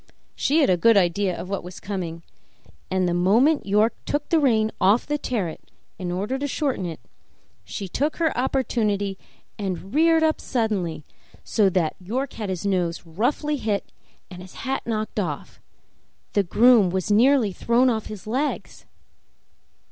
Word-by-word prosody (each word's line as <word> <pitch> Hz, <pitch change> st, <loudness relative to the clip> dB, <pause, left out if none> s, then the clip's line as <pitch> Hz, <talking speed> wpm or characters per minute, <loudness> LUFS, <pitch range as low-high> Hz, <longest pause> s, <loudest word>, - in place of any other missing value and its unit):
She 310 Hz, +4 st, +2 dB
had 280 Hz, -, +3 dB
a 180 Hz, -, +3 dB
good 230 Hz, +4 st, +5 dB
idea 185 Hz, 0 st, +1 dB
of -, -, -6 dB
what 195 Hz, 0 st, -3 dB
was 180 Hz, +1 st, -9 dB
coming, 175 Hz, -4 st, -5 dB, 0.7 s
and 185 Hz, 0 st, +1 dB
the 175 Hz, -, 0 dB
moment 220 Hz, -, +3 dB
York 210 Hz, +3 st, +3 dB
took 295 Hz, 0 st, -2 dB
the 330 Hz, -, +4 dB
rein 220 Hz, -6 st, +2 dB
off 200 Hz, +5 st, +4 dB
the 295 Hz, 0 st, -2 dB
terret 200 Hz, -, -4 dB, 0.3 s
in 180 Hz, -2 st, -3 dB
order 205 Hz, +9 st, -2 dB
to 285 Hz, -, -2 dB
shorten 265 Hz, -, -1 dB
it 160 Hz, -4 st, -7 dB, 0.6 s
she 195 Hz, -, -6 dB
took 290 Hz, -, -1 dB
her 325 Hz, -2 st, 0 dB
opportunity 215 Hz, -6 st, 0 dB, 0.4 s
and 190 Hz, -1 st, -4 dB
reared 325 Hz, +1 st, +4 dB
up 315 Hz, 0 st, +1 dB
so -, -, -13 dB
suddenly 200 Hz, -, -1 dB, 0.5 s
that 190 Hz, -7 st, +2 dB
York 250 Hz, +9 st, -3 dB
had 210 Hz, -3 st, -5 dB
his 185 Hz, 0 st, -4 dB
nose 180 Hz, -4 st, -1 dB
roughly 245 Hz, -, -1 dB
hit 215 Hz, -5 st, -2 dB, 0.4 s
and 180 Hz, 0 st, -9 dB
his 185 Hz, 0 st, -13 dB
hat 270 Hz, +1 st, -1 dB
knocked 215 Hz, -1 st, -2 dB
off; 155 Hz, -8 st, -4 dB, 0.7 s
the 205 Hz, -, +4 dB
groom 215 Hz, +2 st, +5 dB
was 190 Hz, +3 st, -2 dB
nearly 235 Hz, -1 st, +4 dB
thrown 235 Hz, +7 st, +2 dB
off 220 Hz, -3 st, 0 dB
his 210 Hz, -4 st, -8 dB
legs. 260 Hz, +7 st, -3 dB
210 Hz, 160 wpm, -24 LUFS, 185-255 Hz, 0.7 s, good